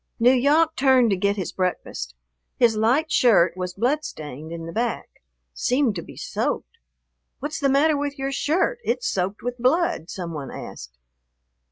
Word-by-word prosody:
N'Yawk 285 Hz, +7 st, +4 dB
turned 260 Hz, -4 st, +4 dB
to -, -, +3 dB
get 200 Hz, +2 st, +1 dB
his 190 Hz, -4 st, -4 dB
breakfast. 120 Hz, -, -3 dB, 0.4 s
His 235 Hz, -3 st, +4 dB
light 250 Hz, +9 st, +2 dB
shirt 185 Hz, -8 st, +4 dB
was 180 Hz, -1 st, -4 dB
blood 265 Hz, +9 st, +1 dB
stained 150 Hz, -, -8 dB
in 165 Hz, -1 st, -6 dB
the 165 Hz, -, -6 dB
back, 235 Hz, +4 st, -2 dB, 0.4 s
seemed 255 Hz, -2 st, +1 dB
to 175 Hz, -, -4 dB
be -, -, -13 dB
soaked. -, -, -3 dB, 0.6 s
"What's 295 Hz, +4 st, -4 dB
the 275 Hz, -, +2 dB
matter 295 Hz, +3 st, +4 dB
with 285 Hz, 0 st, -3 dB
your 270 Hz, 0 st, -2 dB
shirt, 370 Hz, -, 0 dB
it's 470 Hz, -1 st, -1 dB
soaked 190 Hz, +2 st, -2 dB
with 245 Hz, 0 st, -4 dB
blood?" 255 Hz, -, +1 dB
some 175 Hz, -3 st, -5 dB
one 145 Hz, -3 st, -5 dB
asked. 60 Hz, -1 st, -9 dB
240 Hz, 165 wpm, -23 LUFS, 180-285 Hz, 0.6 s, N'Yawk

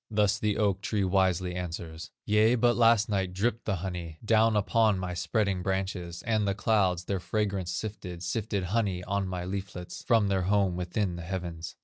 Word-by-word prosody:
Thus 105 Hz, -2 st, +2 dB
the 105 Hz, -1 st, 0 dB
oak 100 Hz, -3 st, +1 dB
tree 105 Hz, -1 st, 0 dB
wisely 95 Hz, -1 st, +1 dB
answers: 85 Hz, -2 st, -6 dB, 0.2 s
"Yea, 110 Hz, +3 st, +4 dB
but 120 Hz, 0 st, +3 dB
last 115 Hz, -2 st, +4 dB
night 95 Hz, -4 st, -1 dB
dripped 115 Hz, +5 st, -1 dB
the 100 Hz, -, 0 dB
honey 85 Hz, -4 st, -5 dB
Down 110 Hz, 0 st, +4 dB
upon 105 Hz, 0 st, +3 dB
my 90 Hz, -1 st, -3 dB
spreading 90 Hz, +2 st, 0 dB
branches, 95 Hz, -2 st, -3 dB
And 110 Hz, -3 st, +1 dB
the 100 Hz, -, 0 dB
clouds 95 Hz, -6 st, +2 dB
their 95 Hz, +1 st, -2 dB
fragrance 100 Hz, 0 st, -1 dB
sifted, 90 Hz, -3 st, -5 dB
Sifted 100 Hz, +2 st, -2 dB
honey 95 Hz, -1 st, -1 dB
on 100 Hz, +1 st, -1 dB
my 90 Hz, -1 st, -4 dB
leaflets, 95 Hz, -1 st, -6 dB
From 115 Hz, -4 st, +4 dB
their 95 Hz, -1 st, +1 dB
home 100 Hz, -3 st, +2 dB
within 90 Hz, +1 st, -2 dB
the -, -, -6 dB
heavens." 85 Hz, -2 st, -5 dB
95 Hz, 175 wpm, -29 LUFS, 90-105 Hz, 0.2 s, Yea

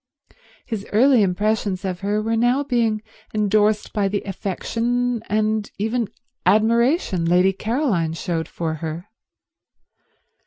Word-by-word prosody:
His 220 Hz, -5 st, -5 dB
early 250 Hz, +2 st, +5 dB
impressions 200 Hz, 0 st, 0 dB
of 180 Hz, -2 st, -3 dB
her 205 Hz, +2 st, -1 dB
were 225 Hz, +1 st, 0 dB
now 245 Hz, +5 st, +2 dB
being 230 Hz, -5 st, 0 dB, 0.3 s
endorsed 210 Hz, 0 st, +2 dB
by 205 Hz, -2 st, +1 dB
the 200 Hz, +1 st, -2 dB
affection 230 Hz, +5 st, -2 dB
and 215 Hz, 0 st, 0 dB
even 225 Hz, +2 st, -1 dB, 0.4 s
admiration 230 Hz, -, +3 dB
Lady 180 Hz, +3 st, +4 dB
Caroline 215 Hz, -, 0 dB
showed 165 Hz, -1 st, -3 dB
for 165 Hz, -2 st, -3 dB
her. 160 Hz, +3 st, -5 dB
215 Hz, 115 wpm, -22 LUFS, 190-230 Hz, 0.4 s, early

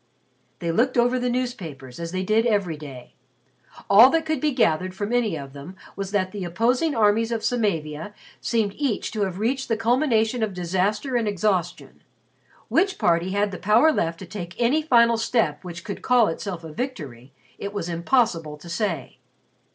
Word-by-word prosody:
They 170 Hz, -2 st, -2 dB
looked 250 Hz, +9 st, +1 dB
over 245 Hz, +1 st, +3 dB
the 250 Hz, 0 st, -1 dB
newspapers, 175 Hz, -, -4 dB
as 165 Hz, 0 st, -5 dB
they 185 Hz, +1 st, -2 dB
did 220 Hz, +4 st, +2 dB
every 200 Hz, -7 st, 0 dB
day. 140 Hz, -5 st, -11 dB, 0.7 s
All 215 Hz, +6 st, +8 dB
that 325 Hz, +2 st, +1 dB
could 315 Hz, -4 st, -1 dB
be 305 Hz, -, +2 dB
gathered 185 Hz, -, +1 dB
from 205 Hz, +4 st, -3 dB
any 225 Hz, -9 st, +1 dB
of 135 Hz, -2 st, -9 dB
them 145 Hz, +7 st, -10 dB, 0.2 s
was 195 Hz, -1 st, -4 dB
that 190 Hz, -2 st, 0 dB
the 205 Hz, -2 st, -5 dB
opposing 245 Hz, -, +1 dB
armies 225 Hz, +1 st, +3 dB
of 225 Hz, -2 st, -2 dB
Samavia 205 Hz, -6 st, -2 dB, 0.2 s
seemed 220 Hz, -4 st, 0 dB
each 275 Hz, -8 st, -1 dB
to 215 Hz, -, -3 dB
have 185 Hz, -2 st, -5 dB
reached 260 Hz, +6 st, -1 dB
the 225 Hz, -, 0 dB
culmination 235 Hz, -1 st, +1 dB
of 210 Hz, -4 st, -1 dB
disaster 190 Hz, +8 st, -1 dB
and 230 Hz, -3 st, +1 dB
exhaustion. 185 Hz, -3 st, -2 dB, 0.7 s
Which 380 Hz, +3 st, +1 dB
party 170 Hz, +1 st, +2 dB
had 205 Hz, 0 st, +1 dB
the 185 Hz, -, -7 dB
power 225 Hz, +10 st, +4 dB
left 165 Hz, -, -1 dB
to 190 Hz, -, -9 dB
take 175 Hz, -1 st, -8 dB
any 250 Hz, +6 st, +3 dB
final 235 Hz, -6 st, +4 dB
step 225 Hz, -10 st, 0 dB
which 170 Hz, -1 st, -8 dB
could 200 Hz, -, -6 dB
call 245 Hz, -3 st, +4 dB
itself 170 Hz, +1 st, -5 dB
a 160 Hz, -2 st, -9 dB
victory, 145 Hz, -, -6 dB, 0.3 s
it 200 Hz, -, -4 dB
was 205 Hz, -5 st, -4 dB
impossible 170 Hz, -, 0 dB
to 170 Hz, +3 st, -12 dB
say. 170 Hz, -, -3 dB
205 Hz, 180 wpm, -24 LUFS, 170-240 Hz, 0.7 s, All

